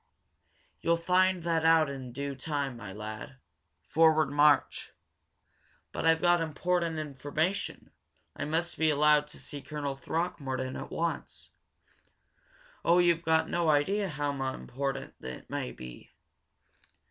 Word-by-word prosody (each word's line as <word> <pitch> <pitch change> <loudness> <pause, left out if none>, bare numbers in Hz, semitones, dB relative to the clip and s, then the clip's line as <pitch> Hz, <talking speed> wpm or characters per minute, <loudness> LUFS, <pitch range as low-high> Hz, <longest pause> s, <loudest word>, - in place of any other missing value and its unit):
"You'll 170 0 +2
find 180 +1 +2
that 165 -1 +1
out 160 -1 +5
in 135 -3 -6
due 140 +3 -4
time, 140 -1 -3
my 115 -5 -8
lad. 110 +6 -7 0.5
Forward 155 -2 +4
march!" 145 -1 +3 1.0
"But - - -1
I've 165 0 +4
got 175 -1 +4
important 165 +1 -1
information! 155 +5 -3 0.4
I - - -3
must 165 +3 -1
be 160 -1 +4
allowed 150 0 +4
to 150 - -10
see 145 - -7
Colonel 145 -2 -4
Throckmorton 135 -4 -3
at - - -6
once! 170 0 -4 1.3
Oh, 170 +1 +4
you've 170 -2 +4
got 160 -1 +2
no 170 -2 +1
idea 190 +7 +2
how 145 -1 -2 0.2
important 135 +1 -4
it 65 - -7
may 60 - -3
be!" 60 -1 -11
155 Hz, 125 wpm, -30 LUFS, 140-165 Hz, 1.3 s, out